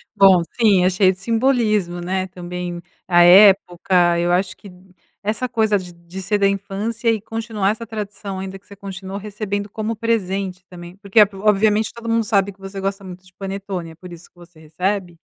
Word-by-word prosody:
Bom 190 -3 +6 0.2
sim, 205 -6 +4
é - - +5
cheio 185 0 +3
de 185 - -9
simbolismo 220 -5 +1
né, 185 +2 -2
também 175 -1 -6 0.3
à 175 -1 +5
época, 180 -2 +5
eu 175 +1 +1
acho 185 +1 0
que 200 - -14
d 180 +1 -19 0.3
essa 220 +4 -1
coisa 220 -3 +2
de 180 -2 -8
de 170 +2 -10
ser 205 +3 0
da 200 -1 +3
infância 200 +4 -2
e 225 -1 +2
continuar 220 -2 -2
essa 225 +2 -6
tradição, 205 -2 -6
ainda 190 0 -7
que - - -35
você 200 - -12
continuou 195 0 -7
recebendo 205 0 -4
como 220 +2 -3
presente 195 -4 -2
também, 175 0 -11
porque 200 +2 +1
é - - +11
obviamente 210 +2 +2
todo 235 0 -10
mundo 230 0 +2
sabe 200 -2 +1
que 195 - -33
você 195 0 -8
gosta 195 +1 -3
muito 185 0 -11
de 185 - -21
panetone, 195 -3 -6
é - - -15
por 175 +1 -12
isso 170 0 -13
que - - -69
você 175 -2 -17
recebe? 175 +3 -3
195 Hz, 200 wpm, -20 LUFS, 180-210 Hz, 0.3 s, é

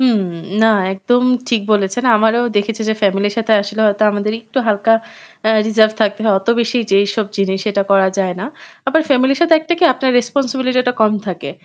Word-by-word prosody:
হুম, 240 -5 +2 0.4
না - - +5 0.3
একদম 245 +6 0 0.3
ঠিক 230 -3 +1
বলেছেন। 200 +4 0
আমারও 225 +2 +2
দেখেছি 220 +2 -1
যে, 220 - +1
ফ্যামিলির 200 +1 +1
সাথে 225 0 0
আসলে 210 +2 -6
হয়তো 205 +1 0
আমাদের 205 +1 -2
একটু 225 +3 -5
হালকা 210 +2 +2 0.6
আ - - +3 0.2
রিজার্ভ 220 0 +3
থাকতে 205 0 0
হয়। 210 -3 +3
অত 195 - -14
বেশি 235 +2 -1
যে 195 - +4
এইসব 205 +1 -2
জিনিস 190 -1 -1
এটা 200 0 0
করা 195 -1 +4
যায় 185 -2 -1
না। 225 - -4 0.4
আবার 320 - +2
ফ্যামিলির 265 0 +2
সাথে 330 -1 +4
একটা 320 +2 -2
কি 360 - +2
আপনার 260 0 -1
রেসপনসিবিলিটি 255 0 -1
টা - - +1
কম 215 -1 +3
থাকে। 180 -2 -5
220 Hz, 195 wpm, -15 LUFS, 200-245 Hz, 0.6 s, না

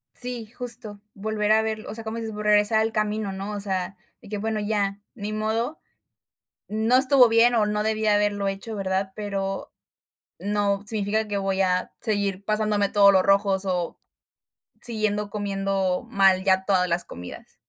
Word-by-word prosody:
Sí, 245 -2 -2
justo, 230 -4 -5
volver 210 +1 0
a 220 0 +4
verlo, 220 -1 -4
o - - -6
sea, 225 - -6
como 220 +1 -4
dices, 225 -1 -5
vo 210 - -5
regresar 210 +1 +4
al 220 0 0
camino, 215 -1 -1
¿no? 195 +2 -5
O 205 - -4
sea, 190 -1 -2 0.2
de - - -15
que 210 - -4
bueno, 215 +1 -2
ya, 205 -1 -1
ni 210 -2 -5
modo. 220 +7 -2 0.9
No 220 +4 +2
estuvo 260 -2 +5
bien 230 +2 +4
o 215 - +3
no 210 0 -1
debí 220 0 -1
haberlo 205 -1 +2
hecho, 195 +3 -6
¿verdad?, 190 -1 -2
pero 195 -2 -4 0.7
no 200 -1 0
significa 215 0 +1
que 205 -1 -2
voy 195 0 -1
a 185 -1 +1
seguir 200 -3 -1
pasándome 215 -1 +1
todos 200 -1 +6
los 190 -1 +4
rojos 195 -1 +3
o 180 -3 -2 0.8
siguiendo 215 -3 +1
comiendo 195 0 -1
mal 195 -4 +3
ya 190 -1 +3
todas 185 -2 +2
las 175 +1 0
comidas. 90 +1 -10
205 Hz, 170 wpm, -24 LUFS, 195-220 Hz, 0.9 s, todos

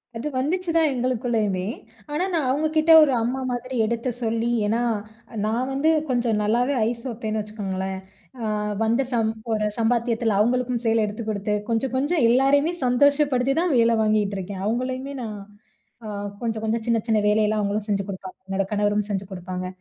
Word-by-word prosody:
அது 230 +6 -4
வந்துச்சுதான் 330 +1 +1
எங்களுக்குள்ளயுமே! 230 -6 0 0.5
ஆனா, 315 +5 0
நான் 320 -5 +1
அவுங்கக்கிட்ட 310 +3 +2
ஒரு 285 - +3
அம்மா 245 +4 -1
மாதிரி 250 +1 -4
எடுத்து 235 +3 -1
சொல்லி 230 +1 0 0.2
ஏன்னா, 225 +3 +1 0.6
நான் 235 +4 -1
வந்து 275 +4 +2 0.2
கொஞ்சம் 240 -3 +1
நல்லாவே 245 +6 +1
ஐஸ் 235 -1 -6
வைப்பேன்னு 220 -2 -3
வச்சுக்கோங்களேன். 190 -3 -4 0.4
அ - - -2 0.4
வந்த 230 +4 +2
சம் 225 -2 +1 0.2
ஒரு 215 -1 0
சம்பாத்தியத்தில 230 -1 +1
அவுங்களுக்கும் 245 +2 +1
சேல 225 0 +3
எடுத்து 210 +2 -5
கொடுத்து, 210 0 -1 0.2
கொஞ்சம், 235 +3 0
கொஞ்சம் 290 +2 +1
எல்லாரையுமே 280 +6 +3
சந்தோஷப்படுத்திதான் 280 +4 +2
வேல 230 0 +4
வாங்கிகிட்டுருக்கேன். 200 -3 -1
அவுங்களயுமே 255 +5 -2
நான் 215 -3 -5 0.7
அ - - -5 0.3
கொஞ்சம், 225 -2 -2
கொஞ்சம் 220 +1 -1
சின்ன, 230 - +3
சின்ன 220 -2 +3
வேலையெல்லாம் 210 0 +2
அவுங்களும் 205 +1 -2
செஞ்சு 200 -1 +1
குடுப்பாங்க. 190 -1 -7
என்னோட 195 0 -1
கணவரும் 205 0 +1
செஞ்சு 195 -1 -2
குடுப்பாங்க. 185 0 -5
230 Hz, 150 wpm, -24 LUFS, 210-255 Hz, 0.7 s, வேல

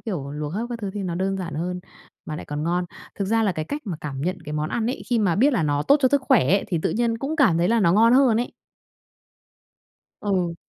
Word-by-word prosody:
kiểu, 165 -11 -4
luộc 150 0 -4
hấp 225 +4 -2
các 240 - -4
thứ 200 -2 -3
thì 205 - -3
nó 180 -3 -3
đơn 195 +2 -1
giản 170 -5 -5
hơn, 180 +3 -3 0.5
mà 155 - -4
lại - - -7
còn 150 +1 -4
ngon. 175 +2 0 0.3
Thực 200 - -2
ra 225 +3 +1
là 205 -3 +2
cái 155 -2 -4
cách 290 - -5
mà 175 - -3
cảm 140 -3 -5
nhận 180 +4 -2
cái 150 - -6
món 150 0 -1
ăn 230 -1 -1
ấy, 255 - -3
khi 240 - +3
mà 190 -6 +2
biết 275 +7 +4
là 215 -10 +1
nó 145 -1 0
tốt 280 - +5
cho 260 - +4
sức 285 +1 +2
khỏe - - +4
ấy, 195 +2 +3
thì 170 - 0
tự - - +1
nhiên 230 0 0
cũng 290 +6 -3
cảm 210 - +4
thấy 175 - +2
là 230 +1 +3
nó 170 -4 +4
ngon 230 +4 +5
hơn 255 -4 +5
ấy. 240 - -2 1.7
Ừ. 185 -4 -1
195 Hz, 270 wpm, -23 LUFS, 165-230 Hz, 1.7 s, tốt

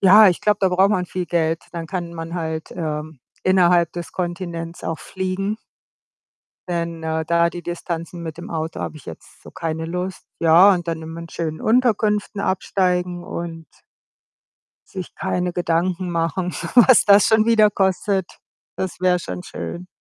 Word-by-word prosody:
ja, 200 +2 +8
ich 175 - 0
glaube, 210 -1 +2
da 190 - +4
braucht 190 +3 +3
man 180 -3 0
viel 180 0 -4
Geld. 165 -1 0
Dann 170 -2 -5
kann 175 -3 -4
man 165 +1 -6
halt, 160 -2 -4
ähm, 155 -3 -4 0.2
innerhalb 175 -2 +4
des 175 -1 -7
Kontinents 170 -2 -4
auch 165 -1 -3
fliegen 190 +3 -3 1.1
denn, 170 -1 -3
äh, 160 0 -1
da 170 +1 +2
die 175 0 -7
Distanzen 170 0 -5
mit 160 -2 -6
dem 170 - -9
Auto 160 0 -3
habe - - -4
ich 145 - -14
jetzt 80 - -12
so - - -12
keine 160 0 -4
Lust. 180 +2 -4 0.2
Ja, 170 +5 +7
und 175 -1 -4
dann 160 -1 -3
immer 165 +1 -7
in 170 - -9
schönen 160 -1 -4
Unterkünften 215 -4 +1
absteigen 180 -2 0
und 165 -1 -6 1.2
sich 185 -2 -7
keine 180 0 -1
Gedanken 175 +1 0
machen, 170 +2 -1 0.2
was 250 0 +7
das 200 0 +7
schon 220 0 +4
wieder 215 -2 +5
kostet. 190 -1 +1 0.5
Das 190 -2 -4
wäre 180 -1 +3
schon 180 - -6
schön. 180 0 -6
175 Hz, 160 wpm, -21 LUFS, 165-190 Hz, 1.2 s, ja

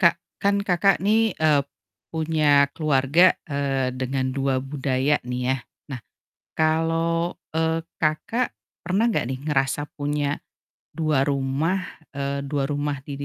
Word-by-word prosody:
Kak, 170 -1 +5 0.3
kan 200 0 +3
Kakak 185 +1 +3
nih, 220 0 +3
eee, 150 -3 +4 0.5
punya 155 -3 +3
keluarga, 155 +3 +4
eee, 140 -3 0
dengan 130 0 -1
2 135 -1 +1
budaya 135 +1 0
nih 125 0 -4
ya. - - -1 0.4
Nah, 130 - -5 0.6
kalau, 165 +2 +1 0.2
eee, 160 0 +1 0.2
Kakak 160 +11 0 0.3
pernah 195 +7 +1
nggak 220 - 0
nih 130 -1 -3
ngerasa 140 +1 0
punya, 145 0 -2 0.6
2 155 -4 +1
rumah, 140 +6 0 0.4
eee, 140 0 -2
2 140 -1 -1
rumah, 145 0 -2
di 145 - -5
150 Hz, 125 wpm, -24 LUFS, 135-165 Hz, 0.6 s, Kak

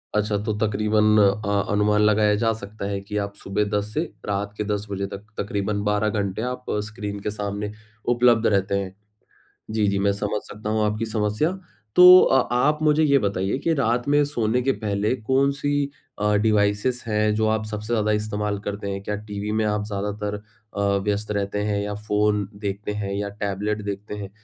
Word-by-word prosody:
अच्छा 105 0 +1
तो 110 -1 -1
तकरीबन 105 0 +2
अ, 100 0 +2
अनुमान 105 +1 +3
लगाया 105 0 +4
जा 115 - +3
सकता 100 0 -7
है 100 -1 -2
कि 105 +1 -5
आप 100 0 -6
सुबह 100 +2 -1
10 105 +1 -4
से 155 - +1 0.2
रात 100 0 -2
के 105 - -1
10 105 0 -2
बजे 100 0 -2
तक 100 +1 -9
तकरीबन 100 0 -2
12 105 +1 +1
घंटे 100 0 -2
आप 125 0 -7 0.2
स्क्रीन 105 -2 -5
के 105 - -3
सामने 105 0 -4 0.4
उपलब्ध 120 -2 +4
रहते 100 -1 +1
हैं। 95 -1 -6 0.8
जी, 110 -2 +1
जी 100 0 +1
मैं 100 0 +2
समझ 105 +1 -2
सकता 105 +1 -6
हूँ 110 0 +1
आपकी 105 +2 -1
समस्या। 110 - 0 0.4
तो 180 0 +10
अ 130 - +4 0.2
आप 150 +4 +2
मुझे 150 +1 +4
ये 140 -2 +5
बताइए 100 +3 0
कि 165 - +2
रात 120 -2 0
में 145 0 +4
सोने 120 -3 0
के 135 +2 +2
पहले 105 +4 0
कौन-सी 140 +4 +1 0.3
अ, 105 0 +2
डिवाइसेज़ 105 +3 +1
हैं 105 0 +2
जो 110 0 +1
आप 110 0 0
सबसे 105 +2 -4
ज़्यादा 110 -1 +1
इस्तेमाल 105 -1 -1
करते 100 0 -4
हैं? 100 0 -4
क्या 105 +1 -2
टीवी 105 0 -5
में - - +1
आप 105 0 0
ज़्यादातर 105 0 -3 0.4
अ, - - 0 0.2
व्यस्त 105 +1 -1
रहते 100 0 -1
हैं 105 -1 0
या 105 0 -3
फ़ोन 105 -1 0
देखते 100 0 -4
हैं 100 0 -3
या 100 0 -2
टैबलेट 105 +1 -3
देखते 100 +1 -5
हैं 100 -2 -6
105 Hz, 190 wpm, -23 LUFS, 100-110 Hz, 0.8 s, तो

